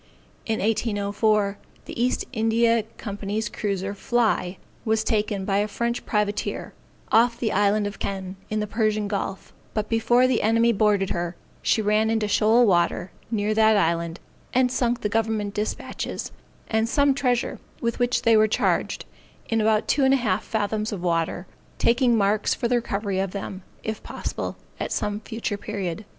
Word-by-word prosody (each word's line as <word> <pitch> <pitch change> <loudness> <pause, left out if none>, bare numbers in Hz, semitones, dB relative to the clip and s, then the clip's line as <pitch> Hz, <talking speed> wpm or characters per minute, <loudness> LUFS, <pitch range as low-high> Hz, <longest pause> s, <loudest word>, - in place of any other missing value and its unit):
In 220 -1 0
1804, 205 -1 +1 0.3
the 235 - -3
East 250 - 0
India 230 0 +3 0.2
Company's 205 +1 -3
cruiser, 200 -1 -2
Fly, 205 -4 0 0.3
was 220 -1 +1
taken 210 -4 0
by 195 0 +1
a 205 - +1
French 235 +3 -2
privateer, 210 -1 -1 0.4
off 235 +1 +4
the 220 -3 0
Island 205 +1 +2
of 205 0 -5
Kenn, 190 -1 -4
in 215 0 -1
the - - -1
Persian 215 -1 0
Gulf; 195 -1 -4 0.2
but 215 -1 -1
before 240 +2 +3
the 255 -3 +2
enemy 230 +2 +3
boarded 205 -2 +2
her, 175 0 -2 0.3
she 220 - +2
ran 215 +1 +2
into 220 -1 +1
shoal 220 +4 +4
water, 175 -1 +2 0.2
near 215 -1 0
that 220 0 +5
island, 170 -2 0 0.4
and 255 -1 +4
sunk 245 -1 0
the - - 0
government 215 -1 -1
dispatches, 210 +1 -4 0.4
and 220 0 +1
some 285 +2 +3
treasure 250 -3 0 0.2
with 235 -1 -2
which 245 +1 +1
they 230 -1 +5
were 215 0 +5
charged, 215 - 0 0.4
in 225 -1 +2
about 215 0 +2
two 280 - +2
and 265 0 +5
a - - +3
half 215 -5 0
fathoms 215 0 -1
of 190 -4 -5
water, 170 +1 0 0.3
taking 240 0 +3
marks 205 +1 +2
for 235 - -1
the 245 +1 +2
recovery 200 -4 -2
of 195 -1 -2
them, 195 -1 -5 0.2
if 220 0 -4
possible, - - -5 0.2
at - - -3
some 205 0 -1
future 220 -1 -4
period. 200 -2 -4
215 Hz, 165 wpm, -24 LUFS, 200-230 Hz, 0.4 s, that